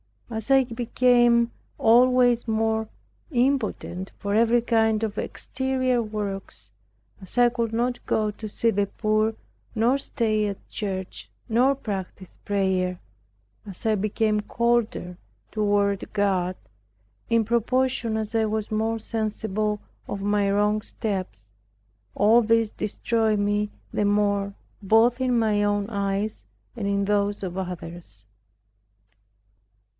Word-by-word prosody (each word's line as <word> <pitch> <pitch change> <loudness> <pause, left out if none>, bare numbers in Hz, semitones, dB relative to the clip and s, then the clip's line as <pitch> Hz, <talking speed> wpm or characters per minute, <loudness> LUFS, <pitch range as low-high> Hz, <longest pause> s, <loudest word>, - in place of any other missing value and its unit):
As 220 +2 -5
I 270 -1 +6
became 240 0 +3 0.3
always 245 0 +4
more 220 0 0 0.4
impotent 240 - -1
for 200 0 -3
every 230 +2 +4
kind 225 -2 +2
of 215 -2 -2
exterior 260 -1 -1
works, 210 -3 -6 0.5
as 190 +5 -13
I 245 0 +6
could 235 -2 -2
not 245 +2 -1
go 215 -1 +1
to 215 +1 -8
see 230 +2 0
the 205 -1 0
poor, 215 +1 0 0.4
nor 240 +5 +3
stay 215 -6 0
at 200 -1 -7
church, 190 -3 -5 0.2
nor 250 +5 +3
practice 195 -6 -6
prayer; 190 -3 0 0.7
as 195 +1 -11
I 220 - +3
became 215 +1 +1
colder 230 -5 0 0.3
toward 205 -2 0
God, 190 -3 +1 0.7
in 230 -1 +3
proportion 235 0 +1
as 220 0 -4
I 225 -1 +2
was 215 0 -2
more 220 +1 0
sensible 215 -1 -2 0.3
of 200 - -4
my 205 0 +1
wrong 210 +1 +2
steps, 185 - -4 0.7
all 220 +4 +5
this 225 0 +2
destroyed 220 0 0
me 205 +1 0 0.2
the 210 - +1
more 200 -1 +1 0.3
both 225 +5 +4
in 250 -2 +2
my 215 -2 +2
own 205 0 0
eyes 200 0 -2 0.3
and 215 -4 -3
in 200 0 +1
those 205 0 0
of 180 -2 -4
others. 170 - -7
215 Hz, 120 wpm, -25 LUFS, 200-235 Hz, 0.7 s, I